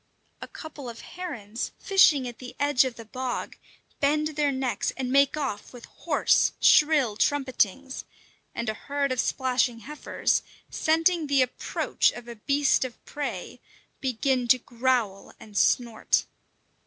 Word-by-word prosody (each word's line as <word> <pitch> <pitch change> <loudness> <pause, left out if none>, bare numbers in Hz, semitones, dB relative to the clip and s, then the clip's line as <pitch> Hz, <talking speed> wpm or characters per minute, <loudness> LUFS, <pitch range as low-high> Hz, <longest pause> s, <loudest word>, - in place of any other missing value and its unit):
A - - -6
couple 295 -5 -9
of 230 0 -9
herons, 235 - -6
fishing 310 -9 +4
at 240 - -9
the 250 -1 -9
edge 285 -2 +3
of 255 -2 -4
the 230 - -10
bog, 255 +3 -4 0.4
bend 300 +2 +2
their 295 -2 0
necks 260 -2 -1
and 255 -2 -3
make 280 +2 +4
off 260 -9 -4
with 245 -1 -11
hoarse, - - +1
shrill 295 -8 +5
trumpetings; 265 -1 0 0.5
and 235 - -3
a 220 - 0
herd 280 +4 -2
of 255 - -1
splashing 250 -3 0
heifers, 300 +6 -1 0.3
scenting 325 0 +2
the 275 -2 +4
approach 250 - 0
of 240 0 -10
a 235 - -6
beast 275 +6 +2
of 255 -2 -6
prey, 290 -1 -5 0.4
begin 255 -1 0
to 255 - +6
growl 240 -5 -1
and 210 -1 -14
snort. 235 +2 +2
260 Hz, 140 wpm, -26 LUFS, 240-285 Hz, 0.5 s, to